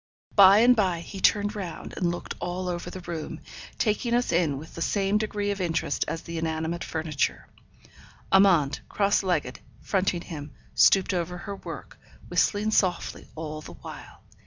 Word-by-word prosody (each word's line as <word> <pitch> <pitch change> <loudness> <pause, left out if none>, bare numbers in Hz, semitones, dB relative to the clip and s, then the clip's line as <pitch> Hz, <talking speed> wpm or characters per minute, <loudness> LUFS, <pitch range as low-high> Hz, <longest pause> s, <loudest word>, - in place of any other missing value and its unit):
By 200 +1 +8
and 250 +1 +6
by 185 -6 +1
he 195 +3 -8
turned 205 +2 +3
round, 185 -5 -6
and 175 - 0
looked 175 - -4
all 180 +1 -3
over 175 -1 -3
the 185 - -8
room, 170 -3 -5 0.4
taking 235 +2 +1
us 245 -5 +1
in 165 -5 +2
with 155 +3 -9
about - - -16
the - - -5
same 200 +3 +1
degree 205 -1 -1
of 200 -1 -3
interest 165 -2 0
as 165 - -4
the 170 -1 -5
inanimate 160 +1 -2
furniture. 155 -3 -2 0.8
Amante, 185 -8 +4
cross 200 -1 +2
legged, 170 -9 -1 0.2
fronting 185 -3 0
him, 150 -4 -8 0.2
stooped 195 0 +5
over 180 0 -2
her 200 +3 -6
work, - - -9 0.3
whistling 210 +1 +2
softly 185 -5 0
all 155 -1 -5
the - - -10
while. - - -11
180 Hz, 165 wpm, -26 LUFS, 165-200 Hz, 0.8 s, By